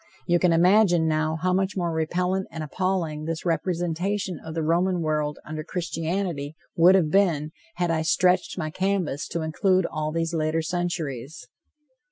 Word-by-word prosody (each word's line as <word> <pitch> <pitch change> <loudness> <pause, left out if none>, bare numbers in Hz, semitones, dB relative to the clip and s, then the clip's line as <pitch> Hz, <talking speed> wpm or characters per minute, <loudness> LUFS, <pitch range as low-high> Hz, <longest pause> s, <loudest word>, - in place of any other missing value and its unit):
You 175 0 +3
can 180 -1 +3
imagine, 175 0 +4
now, 155 0 0
how 185 0 +2
much 190 +1 0
more 175 -2 0
repellant 180 +4 -1
and 160 - -6
appalling 165 -1 -2
this 165 +1 -4
representation 175 +2 -1
of 160 0 -7
the 165 - -1
Roman 175 +3 +1
world 150 -2 -1
under 155 0 -5
Christianity 165 -2 -3 0.2
would 175 +3 +6
have 165 -5 +2
been 160 -6 +2 0.2
had 175 -1 0
I 160 -1 +1
stretched 180 +4 +2
my 155 -3 -3
canvas 185 -6 -1
to 170 -1 -3
include 185 +3 +2
also 155 +1 -3
these 165 0 -1
later 160 0 0
centuries. 160 -6 -3
165 Hz, 160 wpm, -25 LUFS, 155-185 Hz, 0.2 s, would